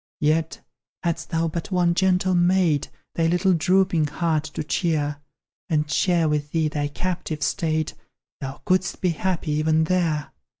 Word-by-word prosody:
Yet, 155 Hz, +2 st, +1 dB, 0.4 s
hadst 170 Hz, -1 st, -2 dB
thou 165 Hz, 0 st, 0 dB
but 165 Hz, +1 st, -4 dB
one 180 Hz, -2 st, +2 dB
gentle 185 Hz, 0 st, +2 dB
mate 175 Hz, -4 st, +2 dB, 0.2 s
Thy 165 Hz, -1 st, +1 dB
little 180 Hz, +3 st, +3 dB
drooping 180 Hz, -2 st, +2 dB
heart 160 Hz, 0 st, 0 dB
to 155 Hz, 0 st, -5 dB
cheer, 150 Hz, -3 st, -1 dB, 0.5 s
And 150 Hz, -2 st, 0 dB
share 170 Hz, +1 st, +2 dB
with 150 Hz, -1 st, -1 dB
thee 160 Hz, -1 st, +1 dB
thy 145 Hz, -1 st, -1 dB
captive 165 Hz, 0 st, -3 dB
state, 160 Hz, -4 st, 0 dB, 0.5 s
Thou 135 Hz, -1 st, -6 dB
couldst 185 Hz, 0 st, +1 dB
be 185 Hz, -, +2 dB
happy 170 Hz, -1 st, -1 dB
even 155 Hz, +1 st, +2 dB
there. 160 Hz, -3 st, 0 dB
165 Hz, 145 wpm, -24 LUFS, 155-180 Hz, 0.5 s, little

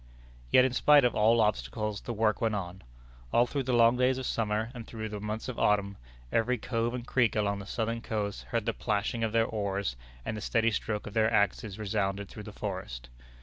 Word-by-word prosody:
Yet 130 Hz, -, +6 dB
in 130 Hz, -, 0 dB
spite 145 Hz, +1 st, +6 dB
of 120 Hz, -, +2 dB
all 115 Hz, +2 st, +4 dB
obstacles, 105 Hz, 0 st, 0 dB
the -, -, -5 dB
work 110 Hz, -1 st, +1 dB
went 110 Hz, -2 st, +1 dB
on. 95 Hz, -1 st, -5 dB, 0.5 s
All 120 Hz, -, +4 dB
through 140 Hz, +3 st, -2 dB
the 130 Hz, -, 0 dB
long 120 Hz, 0 st, +5 dB
days 130 Hz, +1 st, +3 dB
of 130 Hz, -, -4 dB
summer, 110 Hz, 0 st, -1 dB
and 120 Hz, -3 st, -8 dB
through 110 Hz, -1 st, -5 dB
the 105 Hz, -1 st, -5 dB
months 105 Hz, +2 st, -4 dB
of 130 Hz, -, -5 dB
autumn, 100 Hz, -1 st, +2 dB, 0.4 s
every 125 Hz, +3 st, +2 dB
cove 115 Hz, +1 st, -1 dB
and 120 Hz, -1 st, -5 dB
creek 120 Hz, -4 st, +2 dB
along 100 Hz, -1 st, 0 dB
that 100 Hz, -, -9 dB
southern 115 Hz, 0 st, -2 dB
coast 105 Hz, -3 st, -3 dB
heard 115 Hz, -3 st, -2 dB
the 115 Hz, -, 0 dB
plashing 110 Hz, +2 st, -1 dB
of 110 Hz, -, 0 dB
their 115 Hz, 0 st, +3 dB
oars, 100 Hz, -, -2 dB, 0.3 s
and 110 Hz, -, -3 dB
the 105 Hz, -, -5 dB
steady 115 Hz, +2 st, +2 dB
stroke 105 Hz, 0 st, -2 dB
of 105 Hz, -, -7 dB
their 110 Hz, 0 st, +3 dB
axes 100 Hz, -1 st, +1 dB
resounded 100 Hz, -2 st, -2 dB
through 105 Hz, -, -9 dB
the 105 Hz, -, -9 dB
forest. 95 Hz, -, -6 dB
110 Hz, 215 wpm, -29 LUFS, 105-115 Hz, 0.5 s, Yet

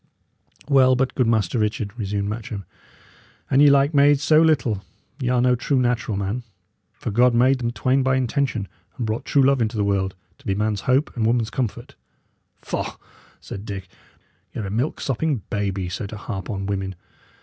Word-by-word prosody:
"Well, 130 Hz, -3 st, +5 dB
but, 130 Hz, 0 st, 0 dB
good 125 Hz, -4 st, +1 dB
Master 110 Hz, -2 st, +1 dB
Richard," 105 Hz, -1 st, -1 dB
resumed 100 Hz, -3 st, -2 dB
Matcham, 105 Hz, -2 st, -5 dB, 0.9 s
"an 135 Hz, -, +4 dB
ye 145 Hz, 0 st, +8 dB
like 140 Hz, +2 st, +4 dB
maids 145 Hz, 0 st, +5 dB
so 155 Hz, +1 st, +5 dB
little, 130 Hz, -11 st, +2 dB, 0.4 s
y' 125 Hz, -3 st, -1 dB
are 125 Hz, -1 st, +2 dB
no 125 Hz, 0 st, +4 dB
true 130 Hz, +3 st, 0 dB
natural 120 Hz, -4 st, 0 dB
man; 100 Hz, +5 st, -2 dB, 0.5 s
for -, -, -5 dB
God 120 Hz, +3 st, +4 dB
made 130 Hz, +2 st, +4 dB
them 120 Hz, -1 st, -1 dB
twain 130 Hz, +3 st, +1 dB
by 130 Hz, 0 st, +2 dB
intention, 130 Hz, -4 st, 0 dB, 0.3 s
and 120 Hz, -, -2 dB
brought 110 Hz, +1 st, -3 dB
true 140 Hz, -, +3 dB
love 135 Hz, -1 st, +3 dB
into 110 Hz, 0 st, -1 dB
the 105 Hz, -, +2 dB
world, 95 Hz, -2 st, 0 dB, 0.2 s
to -, -, -14 dB
be 95 Hz, -, +1 dB
man's 105 Hz, -1 st, -1 dB
hope 135 Hz, +4 st, +2 dB
and 110 Hz, -2 st, +1 dB
woman's 115 Hz, -1 st, +1 dB
comfort." 120 Hz, -5 st, -3 dB, 0.7 s
"Faugh!" -, -, -4 dB, 0.4 s
said 100 Hz, -, -8 dB
Dick. 95 Hz, -3 st, -6 dB, 0.7 s
"Y' -, -, -3 dB
are -, -, -4 dB
a 95 Hz, -, -5 dB
milk 120 Hz, +8 st, -1 dB
sopping 135 Hz, -3 st, -1 dB
baby, 100 Hz, -3 st, -1 dB
so 100 Hz, +3 st, -4 dB
to 105 Hz, -, -8 dB
harp 100 Hz, -1 st, -6 dB
on 95 Hz, -3 st, -3 dB
women. 95 Hz, -1 st, -3 dB
115 Hz, 185 wpm, -23 LUFS, 100-130 Hz, 0.9 s, ye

